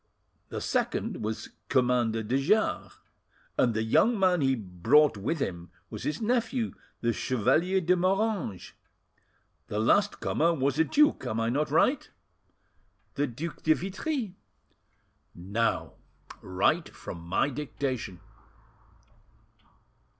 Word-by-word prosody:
The - - -5
second - - -1
was 110 0 -4 0.2
Commander 120 -3 +2
de 125 +6 0
Jars, 210 +8 +1 0.6
and 120 -3 +2
the 110 - 0
young 220 - +3
man 185 -4 +3
he 135 -1 +3
brought 110 - +3
with 110 +12 -2
him 85 -8 -4 0.2
was - - -6
his 150 - -2
nephew, 235 +1 0 0.3
the 120 0 +1
Chevalier 135 - +1
de 180 +1 +3
Moranges. 190 - -1 1.0
The 105 - -4
last 200 - +2
comer 170 +2 +1
was 140 +1 0
a - - +6
duke; 300 - +3
am 110 - -2
I 115 0 +1
not 145 +5 0
right?" - - +2 1.0
"The 145 +5 0
Duc 145 +7 -6
de 155 - +4
Vitry." 210 - -3 1.0
"Now 100 +6 -1 0.5
write 90 0 +1
from 85 - -9
my 95 +11 0
dictation." 130 - -4
135 Hz, 120 wpm, -28 LUFS, 110-185 Hz, 1.0 s, a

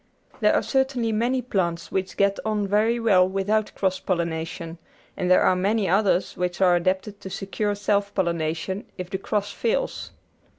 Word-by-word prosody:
There - - +3
are - - +2
certainly 265 -4 0
many 245 +4 0
plants 170 -7 -2
which 190 -1 -2
get 200 0 +2
on 215 -2 0
very 215 +4 +2
well 190 -5 +4
without 205 +3 0
cross 190 -1 0
pollination, 165 -1 -3 0.4
and 180 -2 -2
there 185 - +5
are - - +4
many 200 +2 +1
others 190 -1 +2
which 180 -1 -2
are 180 -2 +5
adapted 190 +3 -1
to 190 - -7
secure 205 +2 -2
self 205 0 0
pollination 170 +2 -1
if 180 0 -6
the 190 - -2
cross 205 0 -2
fails. - - -2
195 Hz, 165 wpm, -24 LUFS, 180-215 Hz, 0.4 s, there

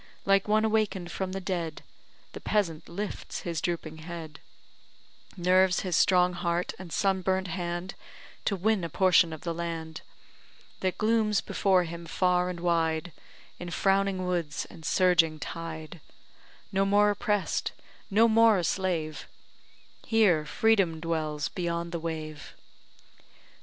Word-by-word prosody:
Like 195 0 +3
one 215 +1 +3
awaken'd 210 -5 0
from 190 +1 -3
the 195 - -3
dead, 175 -4 -3 0.5
The - - -7
peasant 175 -7 -1
lifts 200 +4 -5
his 170 -3 -3
drooping 165 -2 -3
head, 160 -2 -8 1.0
Nerves 185 +1 +3
his 180 -3 -1
strong 180 -1 +4
heart 175 0 -1
and 185 -3 -9
sunburnt 190 0 0
hand, 175 +1 -4 0.5
To 200 - +1
win 200 0 +1
a 170 - -3
potion 180 0 +4
of 160 - -7
the 170 - -3
land, 165 -1 -5 0.8
That 185 -1 -1
glooms 215 -1 +2
before 190 -2 +2
him 170 0 -7
far 180 +1 +1
and 175 -2 -6
wide 165 -1 0 0.5
In 175 - -6
frowning 195 0 +1
woods 170 -5 -2
and 160 - -13
surging 165 -2 +3
tide 160 0 -7 0.7
No 195 0 +2
more 205 +1 +4
oppress'd, 210 -2 -1 0.4
no 220 +3 +5
more 225 -1 +5
a 180 - -1
slave, 170 -4 -2 0.8
Here 185 -9 +3
freedom 195 -3 +2
dwells 155 -2 -2
beyond 170 -1 -3
the 170 - -3
wave. 155 -2 -6
180 Hz, 130 wpm, -28 LUFS, 165-195 Hz, 1.0 s, no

